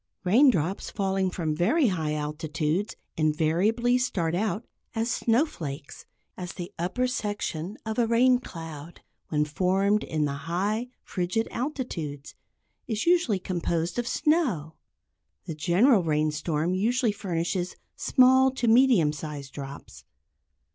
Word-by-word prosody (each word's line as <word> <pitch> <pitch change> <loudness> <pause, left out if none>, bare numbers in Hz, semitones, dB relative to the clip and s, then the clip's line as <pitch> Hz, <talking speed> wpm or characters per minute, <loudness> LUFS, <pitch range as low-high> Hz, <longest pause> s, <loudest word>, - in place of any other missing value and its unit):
Raindrops 195 - +3
falling 195 -2 0
from 165 -4 -2
very 255 - +3
high 160 -5 -1
altitudes 155 +5 -2 0.2
invariably 175 +11 +2
start 175 -10 -1
out 210 +4 -1 0.3
as 225 +2 0
snowflakes, 175 - -1 0.3
as 180 -2 -6
the 175 -1 -7
upper 185 +9 0
section 205 -6 -3
of 220 +1 -2
a 235 - +3
rain 245 +2 +4
cloud, 165 - -9 0.3
when 150 -1 +1
formed 190 +6 +1
in 155 -1 -1
the 140 +2 -5
high 205 +7 0 0.2
frigid 185 +5 -1
altitudes, 185 - -4 0.5
is 220 -2 -2
usually 340 - +3
composed 175 +1 -2
of 240 - -2
snow. 260 - +1 0.7
The 170 - -4
general 190 - +4
rain 155 -2 +1
storm 155 +3 -1
usually 230 +4 +1
furnishes 180 -2 -2 0.2
small 260 0 +5
to 245 -2 -1
medium 225 - +5
sized 145 -2 -7
drops. 140 0 -9
185 Hz, 120 wpm, -27 LUFS, 160-230 Hz, 0.7 s, small